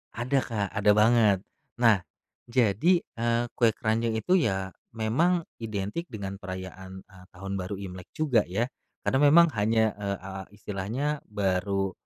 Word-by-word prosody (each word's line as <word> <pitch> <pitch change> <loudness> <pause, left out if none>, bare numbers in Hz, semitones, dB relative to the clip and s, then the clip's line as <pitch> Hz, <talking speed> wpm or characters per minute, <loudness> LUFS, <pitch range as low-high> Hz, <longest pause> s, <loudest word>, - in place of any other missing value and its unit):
Ada, 125 +4 +1
Kak, 105 -4 -2
ada 105 -1 +3
banget. 110 -2 +5 0.4
Nah 115 -4 +6 0.5
jadi, 125 - +3
eee, 115 +1 -1
kue 115 -3 +2
keranjang 115 +1 0
itu 180 +12 +2
ya 95 - -1 0.2
memang 160 +11 +1 0.2
identik 110 - -4
dengan 100 - -6
perayaan, 95 0 -8
eee, 95 -2 -17
Tahun 95 +2 -6
Baru 95 +2 -4
Imlek 95 -2 -8
juga 130 -9 +2
ya, 105 +7 -1 0.4
kadang 140 +2 +3
memang 170 +3 +7
hanya, 110 +1 +2
eee, 100 -1 -2
a 95 - -7 0.2
istilahnya 110 +9 -3
baru, 95 -1 0
110 Hz, 140 wpm, -27 LUFS, 95-120 Hz, 0.5 s, memang